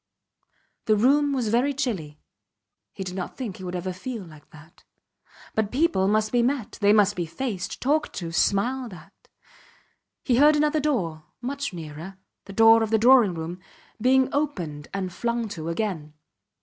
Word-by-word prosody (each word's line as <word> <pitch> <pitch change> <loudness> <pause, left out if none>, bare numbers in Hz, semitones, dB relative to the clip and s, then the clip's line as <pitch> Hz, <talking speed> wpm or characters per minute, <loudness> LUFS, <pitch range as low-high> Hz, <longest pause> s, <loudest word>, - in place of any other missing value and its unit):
The 215 - +4
room 280 +6 +3
was 250 -5 -1
very 255 +5 +1
chilly. 185 - -3 0.7
He 195 - -6
did 180 -1 -6
not 185 -1 -5
think 230 -8 -5
he 185 - -10
would 180 0 -5
ever 180 +1 -3
feel 225 +3 -6
like 155 -4 -15
that. 155 +1 -17 0.7
But 215 -2 -1
people 270 - +2
must 215 +1 +1
be 245 - +3
met 250 -2 -2
they 205 0 +5
must 205 -1 +4
be 175 -2 -3
faced 190 +1 -4
talked 295 +3 0
to 170 -3 -5
smiled 225 +6 0
at. 160 -2 -15 1.1
He 245 -3 +2
heard 300 +3 +6
another 300 +1 +2
door, 180 - -1
much 280 +2 -4
nearer 165 +2 -8 0.3
the 195 - -10
door 225 +2 +6
of 220 - 0
the 220 - +3
drawing 230 -5 +5
room 165 +2 -5 0.4
being 260 +2 +4
opened 175 - -2
and 190 -2 -4
flung 235 +1 -2
to 165 -4 -5
again. 165 -5 -3
210 Hz, 165 wpm, -25 LUFS, 180-255 Hz, 1.1 s, heard